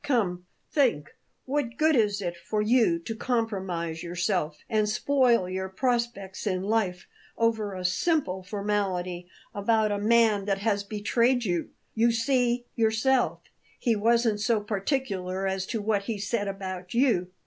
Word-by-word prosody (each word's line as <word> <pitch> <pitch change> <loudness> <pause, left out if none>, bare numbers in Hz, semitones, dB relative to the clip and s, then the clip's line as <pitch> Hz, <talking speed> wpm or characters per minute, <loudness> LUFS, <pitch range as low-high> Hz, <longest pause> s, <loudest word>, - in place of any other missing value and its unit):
Come, 195 -11 0 0.2
think! 235 - +1 0.3
What 260 -3 -2
good 315 0 +4
is 205 -4 +2
it 175 -1 -3
for 190 +5 -3
you 215 -5 +3
to 225 +6 -5
compromise 190 -9 -2
yourself 175 -3 -1
and 215 -2 +1
spoil 240 -3 +2
your 190 +1 -3
prospects 235 -3 -2
in 185 -2 0
life 200 -4 0 0.3
over 220 -3 0
a 185 -1 -5
simple 190 - +1
formality 185 -3 -2 0.3
about 215 +1 +2
a 205 - -1
man 215 -2 +3
that 195 -1 0
has 205 0 0
betrayed 235 +4 +1
you? 175 -4 -1 0.2
You 230 +1 +3
see 240 +1 +1
yourself, 230 +3 +2 0.4
he 235 -3 +1
wasn't 225 0 +2
so 230 0 +2
particular 195 -3 -2
as 190 0 -1
to 225 -4 -3
what 205 -2 0
he 225 -1 -2
said 205 +1 -2
about 185 -1 -5
you." 235 -8 +3
210 Hz, 145 wpm, -27 LUFS, 190-235 Hz, 0.4 s, good